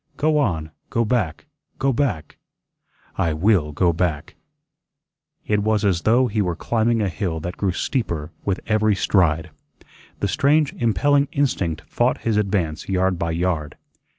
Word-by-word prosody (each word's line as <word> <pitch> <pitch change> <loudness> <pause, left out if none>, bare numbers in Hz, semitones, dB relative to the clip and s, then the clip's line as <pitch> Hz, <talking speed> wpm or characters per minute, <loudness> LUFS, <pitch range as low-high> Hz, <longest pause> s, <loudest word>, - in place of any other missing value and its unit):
"Go 155 0 +2
on, 80 - -1 0.2
go 115 0 +1
back, 105 - -1 0.3
go 135 0 +1
back. 115 - -2 0.8
I 80 - +1
WILL 85 -2 +2
go 85 +3 +2
back." 80 -3 -2 1.1
It 105 -1 +1
was 105 0 +1
as 90 -4 +2
though 120 +4 +4
he 110 -3 0
were 90 -3 -1
climbing 115 +3 +1
a - - +1
hill 90 -3 -3
that 90 +2 -5
grew 100 -2 0
steeper 85 - -2
with 95 -2 -1
every 110 -1 +2
stride. 85 -4 +1 0.7
The 100 - 0
strange 145 - +2
impelling 140 +5 +2
instinct 95 - -1
fought - - 0
his 115 -2 +1
advance 95 -7 -1
yard 95 -1 +1
by 85 - -1
yard. 80 -2 -2
100 Hz, 150 wpm, -22 LUFS, 85-115 Hz, 1.1 s, though